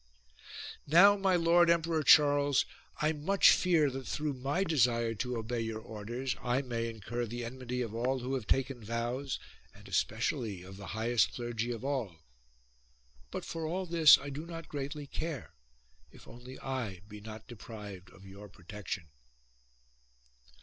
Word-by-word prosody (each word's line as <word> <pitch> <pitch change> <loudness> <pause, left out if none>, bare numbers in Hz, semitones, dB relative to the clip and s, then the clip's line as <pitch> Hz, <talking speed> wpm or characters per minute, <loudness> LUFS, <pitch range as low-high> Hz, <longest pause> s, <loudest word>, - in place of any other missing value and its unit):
1 - - -34
8. 145 - -8
Now, 200 +4 +9
my 195 -2 +2
Lord 170 0 +5
Emperor 165 -1 +2
Charles, 145 -2 +5 0.4
I 155 - +3
much 180 +7 +5
fear 165 -6 +3
that 130 -1 -6
through 150 -1 -2
my 140 +8 -1
desire 120 -9 +2
to 125 +3 -3
obey 115 +2 -3
your 110 -1 -3
orders 115 +4 -4
I 125 +2 0
may 115 -2 -2
incur 115 +2 -4
the 120 +2 -5
enmity 125 0 -4
of 110 -2 -6
all 125 +3 0
who 130 +1 -4
have 125 -5 -3
taken 130 -3 0
vows 120 +5 -2 0.4
and - - -15
especially 110 - -1
of 95 +1 -11
the 100 -1 -9
highest 115 +1 +2
clergy 120 -1 -3
of 120 +2 -5
all. 130 -11 -2 1.1
But - - -5
for 165 -1 -4
all 185 +4 -2
this 165 -3 +8
I 140 0 -7
do 150 +4 -6
not 165 -1 -8
greatly 145 +1 -4
care, 155 - -5 0.6
if - - -16
only 125 +2 -11
I 120 -9 -4
be 105 -1 -10
not 110 +1 -9
deprived 105 -4 -9
of 95 +2 -16
your 100 +2 -11
protection. 95 0 -6
125 Hz, 160 wpm, -32 LUFS, 115-150 Hz, 1.1 s, Now